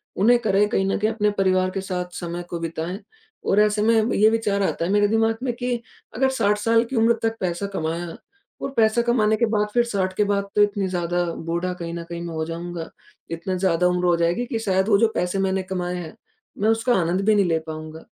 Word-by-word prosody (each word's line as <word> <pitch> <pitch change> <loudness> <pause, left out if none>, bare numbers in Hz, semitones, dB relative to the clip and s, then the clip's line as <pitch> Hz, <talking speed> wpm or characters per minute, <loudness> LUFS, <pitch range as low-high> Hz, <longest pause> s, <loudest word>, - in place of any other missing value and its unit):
उन्हें 235 +6 +4
करें, 205 -2 +2
कहीं 195 - +1
न 195 - 0
कहीं 215 +1 +1
अपने 210 -2 +1
परिवार 185 -1 +2
के 195 - -3
साथ 180 -2 -4
समय 175 0 -5
को 170 - -4
बिताएँ। 165 +3 -4 0.5
और 205 - +4
ऐसे 210 0 +3
में 225 0 +3
ब - - 0
ये 215 +2 +5
विचार 210 -3 0
आता 170 - -1
है 180 - -1
मेरे 205 0 +4
दिमाग़ 225 +1 +2
में 245 -3 -1
कि 245 0 -1 0.4
अगर 265 +2 +2
60 210 -5 +1
साल 230 +2 +3
की 250 +2 -6
उम्र 230 +1 +4
तक 225 0 0
पैसा 180 +1 -2
कमाया 165 +1 -2 0.5
और - - -2
पैसा 220 +1 +4
कमाने 225 -3 +2
के 235 - +3
बाद 210 -1 +1
फिर 240 -1 +4
60 195 -5 -1
के 210 - +2
बाद 200 0 0
तो 210 - +4
इतनी 205 -2 +2
ज़्यादा 175 -1 -1 0.2
बूढ़ा 170 +2 -1
कहीं 170 -1 -6
न 170 - -5
कहीं 170 0 -5
मैं 170 -1 -5
हो 160 - -1
जाऊँगा, 170 0 -6 0.4
इतना 175 +3 -3
ज़्यादा 180 -1 +2
उम्र 180 0 0
हो 175 -1 +4
जाएगी, 170 +8 +1
कि 235 -2 -3
शायद 190 -2 +1
वो 200 - +5
जो 230 - +5
पैसे 180 +2 -1
मैंने 190 0 0
कमाएँ 180 -1 -3
हैं, 165 -3 -7 0.4
मैं 210 +2 +1
उसका 225 +2 +2
आनंद 175 +3 0
भी 215 0 +4
नहीं 200 -2 +3
ले 165 -2 +1
पाऊँगा। 155 0 -7
195 Hz, 235 wpm, -23 LUFS, 175-220 Hz, 0.5 s, ये